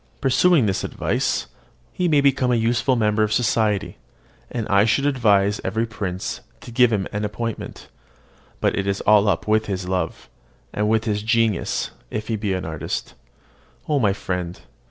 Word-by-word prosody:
Pursuing 135 Hz, +2 st, +4 dB
this 95 Hz, -2 st, -1 dB
advice, -, -, -1 dB, 0.5 s
he 180 Hz, -, 0 dB
may 150 Hz, -4 st, +4 dB
become 135 Hz, -2 st, +2 dB
a -, -, +3 dB
useful 120 Hz, +3 st, +1 dB
member 110 Hz, -2 st, +1 dB
of 110 Hz, -1 st, +1 dB
society, 110 Hz, -3 st, +1 dB, 0.5 s
and 115 Hz, -3 st, -3 dB
I 100 Hz, 0 st, +4 dB
should 125 Hz, +6 st, +2 dB
advise 105 Hz, -7 st, +2 dB
every 110 Hz, +1 st, -1 dB
prince 95 Hz, -5 st, -4 dB, 0.2 s
to -, -, -10 dB
give 125 Hz, 0 st, +4 dB
him 100 Hz, -3 st, 0 dB
an 105 Hz, +1 st, -3 dB
appointment; 110 Hz, +2 st, -5 dB, 0.7 s
but -, -, +2 dB
it 100 Hz, 0 st, -2 dB
is 100 Hz, 0 st, -1 dB
all 105 Hz, 0 st, +5 dB
up -, -, -1 dB
with 110 Hz, 0 st, +2 dB
his 95 Hz, -2 st, -3 dB
love, 90 Hz, -3 st, -3 dB, 0.5 s
and 105 Hz, 0 st, 0 dB
with 110 Hz, 0 st, +2 dB
his 105 Hz, -2 st, -1 dB
genius 115 Hz, -3 st, 0 dB, 0.2 s
if 110 Hz, +1 st, -5 dB
he 115 Hz, -, +1 dB
be 105 Hz, -2 st, -2 dB
an 90 Hz, -, -4 dB
artist. 80 Hz, -1 st, -4 dB, 0.7 s
O 150 Hz, -2 st, +2 dB
my 105 Hz, -5 st, +3 dB
friend! 90 Hz, -3 st, -4 dB
110 Hz, 170 wpm, -22 LUFS, 100-120 Hz, 0.7 s, all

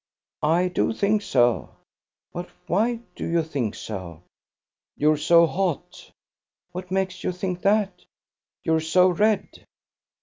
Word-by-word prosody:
"I 170 Hz, +4 st, +3 dB
do 180 Hz, -, 0 dB
think 210 Hz, 0 st, +1 dB
so." 120 Hz, -, +1 dB, 0.6 s
"But 175 Hz, +1 st, -5 dB, 0.2 s
why 230 Hz, +5 st, +1 dB
do -, -, -6 dB
you 170 Hz, 0 st, +1 dB
think 135 Hz, -9 st, -3 dB
so?" 90 Hz, -5 st, -7 dB, 0.7 s
"You're 150 Hz, +1 st, +4 dB
so 170 Hz, +3 st, +5 dB
hot." 175 Hz, -2 st, -3 dB, 0.6 s
"What 180 Hz, 0 st, -7 dB
makes 190 Hz, -1 st, -2 dB
you -, -, 0 dB
think 180 Hz, 0 st, -4 dB
that?" 200 Hz, -3 st, +1 dB, 0.6 s
"You're 160 Hz, -2 st, +2 dB
so 180 Hz, +3 st, +4 dB
red." 210 Hz, +4 st, +2 dB
180 Hz, 125 wpm, -24 LUFS, 155-190 Hz, 0.7 s, so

